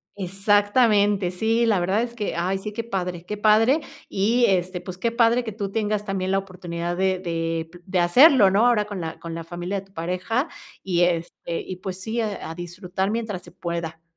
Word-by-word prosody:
exactamente. 205 +1 +2
Sí, 225 +5 +1
la 210 -5 +3
verdad 195 +5 +1
es 235 -1 -3
que 210 -3 -3
ay 185 +3 0
sí, 210 +2 -6
qué 230 +2 -4
padre, 180 -5 -3
qué 210 - -4
padre 225 +8 +4 0.3
y, 230 +5 +2
este, 185 -2 0
pues, 185 -2 -8
qué 230 +5 0
padre 235 +1 +3
que 220 - -5
tú 200 -2 -4
tengas 210 -1 -1
también 190 -2 -2
la 195 - +3
oportunidad 175 -3 -4
de 190 0 +1
de 165 -2 -2 0.2
de 185 -2 0
hacerlo, 240 - +7
¿no? 205 +5 +3
Ahora, 230 -4 +3
con 205 -4 -6
la 160 -1 -5
con 165 -1 -6
la 165 - -5
familia 175 +3 -4
de - - -18
tu 195 - -28
pareja, 185 - -1 0.4
y 180 -2 +1
este, 170 -1 -1
y 185 - -6
pues 185 0 -6
sí, 230 +3 -2
a 210 -6 -4
a 165 - -6
disfrutar 180 +3 -3
mientras 220 -5 -3
se - - -15
pueda. 170 -2 -5
195 Hz, 205 wpm, -24 LUFS, 175-215 Hz, 0.4 s, hacerlo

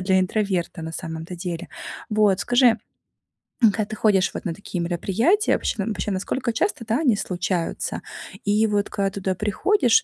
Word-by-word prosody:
для 190 0 +3
интроверта 185 -2 0
на 160 0 -5
самом-то 165 +1 -6
деле. 175 -1 -5 0.4
Вот 210 -3 +3
скажи, 245 +6 +4 1.0
м, 215 - +8
когда 215 0 -1
ты 215 - -6
ходишь 195 -4 +3
вот - - -6
на 170 - -1
такие 180 -1 -5
мероприятия, 200 - +2
вообще 210 - 0
вообще 210 -2 -2
насколько 235 +6 -1
часто, 230 - -1
да, 230 +6 +1
они 245 -10 +3
случаются? 180 -2 -2 0.4
И 210 +2 +3
вот 205 -1 0
когда 195 -1 0
туда 190 -1 -2
приходишь, 400 - +3
200 Hz, 160 wpm, -23 LUFS, 180-220 Hz, 1.0 s, м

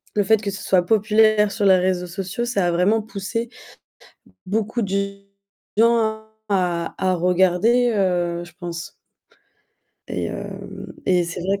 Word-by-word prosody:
le 205 - +3
fait 220 +2 +3
que 200 - -3
ce 200 - -7
soit 180 -2 +2
populaire 215 0 +3
sur 210 - -2
les 190 -1 +6
réseaux 180 -1 0
sociaux, 190 +5 -4
ça 240 -6 0
a - - +1
vraiment 195 +6 +2
poussé 220 +2 -4 1.0
beaucoup 220 +4 -1
de 200 0 -2 0.6
gens 230 +1 +5 0.5
à 180 -4 0
à 185 -1 +1
regarder, 185 +7 +3
heu, 175 -3 0
je 175 - -15
pense 170 -2 -6 1.2
et - - -2
hem, - - -7
et 180 -2 +3
c'est 170 +1 -6
vrai 195 +3 -1
195 Hz, 145 wpm, -22 LUFS, 180-215 Hz, 1.2 s, les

